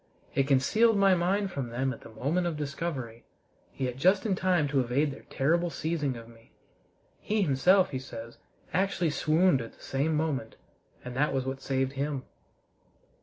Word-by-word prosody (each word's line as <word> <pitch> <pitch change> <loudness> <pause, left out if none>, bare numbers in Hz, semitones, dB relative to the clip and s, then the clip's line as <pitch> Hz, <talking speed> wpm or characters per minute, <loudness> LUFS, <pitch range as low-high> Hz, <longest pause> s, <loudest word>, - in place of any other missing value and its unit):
It 135 - +1
concealed 210 - +4
my 195 -1 +5
mind 190 +3 +1
from 135 -7 -4
them 130 +3 -1
at - - -12
the - - -12
moment 145 +11 -1
of 165 -3 -3
discovery, 140 -5 -4 0.5
yet 125 -2 -2
just 185 - +3
in 210 - +2
time 180 -5 +2
to 140 -1 +2
evade 130 +4 +1
their 135 - -12
terrible 170 +6 +1
seizing 155 -5 -2
of 115 0 -10
me. 115 0 -19 0.7
He 215 -1 0
himself, 180 +5 +4
he 130 - -2
says, 115 -2 -9 0.3
actually 180 -2 +1
swooned 155 -1 +3
at 115 - -8
the - - -19
same 145 +4 0
moment, 145 -7 -2 0.5
and 125 0 -6
that 145 +1 +1
was 130 -1 0
what 135 0 -4
saved 135 0 -1
him. 140 -1 -2
140 Hz, 170 wpm, -29 LUFS, 130-175 Hz, 0.7 s, my